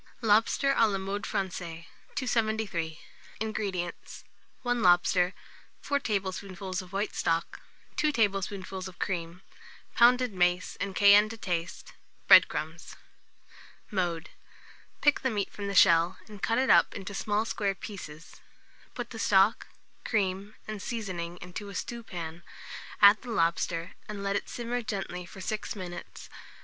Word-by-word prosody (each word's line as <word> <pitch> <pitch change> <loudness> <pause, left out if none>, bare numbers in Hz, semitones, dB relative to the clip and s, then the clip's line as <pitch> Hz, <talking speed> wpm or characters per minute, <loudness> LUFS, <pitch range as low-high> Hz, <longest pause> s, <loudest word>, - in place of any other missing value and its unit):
LOBSTER 225 +6 +3
(a 225 - +5
la 200 -2 -1
Mode 195 +2 -4
Francaise). 170 -4 -4 0.3
273. 220 - -1 0.4
INGREDIENTS. 200 -5 -4 0.4
1 245 -1 0
lobster, 180 0 +4 0.4
4 285 0 0
tablespoonfuls 190 -4 -3
of 185 -1 -13
white 200 +2 -2
stock, 165 0 -1 0.4
2 305 - +2
tablespoonfuls 195 -4 -1
of 185 - -12
cream, 175 -1 -4 0.5
pounded 245 -1 +5
mace, 180 0 +1
and 195 -1 -3
cayenne 205 +1 +7
to 225 - -7
taste; 175 -5 -4 0.3
bread - - +9
crumbs. 160 +2 -6 1.0
Mode. 175 -3 -2 0.7
Pick 290 0 +4
the 260 - 0
meat 205 -4 -2
from 200 -1 -6
the 200 - -3
shell, 170 +1 +5
and 210 -3 -11
cut 230 - +1
it 260 +1 +3
up - - +5
into 200 0 -6
small 210 +2 0
square 200 -3 -1
pieces; 165 -7 -9 0.6
put 245 -1 -5
the 225 - -7
stock, 200 +1 +3 0.4
cream, 200 -1 -1
and 215 -2 -5
seasoning 180 -7 -4
into 185 +4 -7
a 200 - -9
stewpan, 175 -9 -6 0.6
add 200 +1 +8
the 250 - -9
lobster, 170 -3 0 0.2
and 205 -1 -5
let 200 0 0
it - - -2
simmer 240 +1 -3
gently 195 -6 -4
for 190 - -11
6 215 +3 -3
minutes. 180 -3 -8
195 Hz, 135 wpm, -29 LUFS, 180-220 Hz, 1.0 s, bread